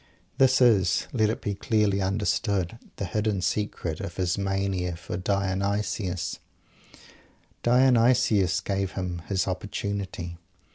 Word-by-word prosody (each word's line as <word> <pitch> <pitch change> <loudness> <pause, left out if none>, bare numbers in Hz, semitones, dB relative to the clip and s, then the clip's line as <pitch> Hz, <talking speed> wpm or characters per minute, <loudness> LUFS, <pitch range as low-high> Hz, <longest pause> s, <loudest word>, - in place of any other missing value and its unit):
This 130 -1 +5
is, 100 -8 +4
let 110 -4 +3
it 110 - -3
be 100 - -1
clearly 100 -1 +1
understood, 100 +1 0 0.2
the 100 - -3
hidden 105 +2 -1
secret 90 -7 -2
of 100 -3 -6
his 90 -1 +1
mania 95 -3 -1
for 85 - -6
Dionysus 100 0 -1 1.2
Dionysus 120 -6 +4
gave 95 -1 -2
him 90 -2 -4
his 95 -1 0
opportunity. 95 -2 -4
100 Hz, 110 wpm, -26 LUFS, 95-105 Hz, 1.2 s, This